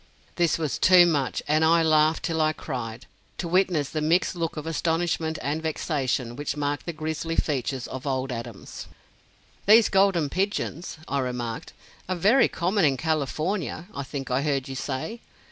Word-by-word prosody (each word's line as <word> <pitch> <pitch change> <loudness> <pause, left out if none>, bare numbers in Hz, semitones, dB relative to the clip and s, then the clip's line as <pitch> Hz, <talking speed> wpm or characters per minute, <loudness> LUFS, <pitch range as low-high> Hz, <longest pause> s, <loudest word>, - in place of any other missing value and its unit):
This 170 -2 +2
was 155 -4 -2
too 180 -1 +7
much, 145 -6 0
and 155 +1 +3
"I 165 +1 +5
laughed 155 0 +3
till 160 -2 0
I 155 0 +2
cried" 115 -5 -6 0.3
to 175 - -3
witness 175 -5 +2
the 155 - -3
mixed 170 +4 +2
look 165 -2 -3
of 150 - -5
astonishment 165 0 -1
and 150 +3 -1
vexation 135 -6 -2
which 145 +1 -4
marked 145 +2 -2
the - - -1
"grizzly" 160 +1 -3
features 135 -4 -1
of 130 +2 -7
old 130 -1 -1
Adams. 115 -4 -7 0.8
"These 220 +1 +7
Golden 190 -5 +3
Pigeons," 185 -2 -2
I 140 - -1
remarked, 125 -3 -4 0.4
"are 185 - 0
very 210 +10 +4
common 185 +4 0
in 140 -3 +3
California, 160 +4 -2
I 140 - -4
think 135 -1 -6
I 130 +2 +2
heard 140 -3 -1
you 135 - -5
say? 140 - -4
155 Hz, 165 wpm, -25 LUFS, 135-170 Hz, 0.8 s, too